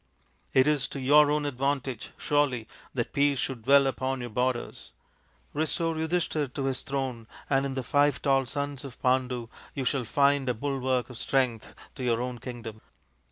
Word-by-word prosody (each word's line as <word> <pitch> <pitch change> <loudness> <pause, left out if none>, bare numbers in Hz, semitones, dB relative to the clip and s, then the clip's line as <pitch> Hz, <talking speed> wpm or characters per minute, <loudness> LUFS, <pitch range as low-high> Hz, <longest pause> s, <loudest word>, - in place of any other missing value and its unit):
It 130 0 +6
is 150 -3 +2
to 140 - -6
your 145 +3 +6
own 150 0 +1
advantage, 135 -2 -2
surely, 135 -6 +1 0.3
that 120 -3 -2
peace 140 0 +3
should 125 -3 -3
dwell 140 +1 +6
upon 135 0 -1
your 120 -1 -5
borders. 125 +1 -2 0.6
Restore 160 +2 0
Yudhishthir 160 -3 -1
to 135 - -1
his 135 -1 0
throne, 130 -4 -3 0.2
and 135 0 +3
in 135 - -5
the 130 - -2
five 145 +1 +3
tall 135 -2 +2
sons 140 0 -3
of 135 -4 -9
Pandu 125 -2 +1 0.3
you 135 -3 -2
shall 130 0 +1
find 140 +1 +3
a 125 - +1
bulwark 130 -1 -1
of 125 - -9
strength 125 -5 0 0.2
to 130 - -7
your 120 -2 +2
own 125 0 -3
kingdom. 115 -4 -7
135 Hz, 170 wpm, -28 LUFS, 125-145 Hz, 0.6 s, It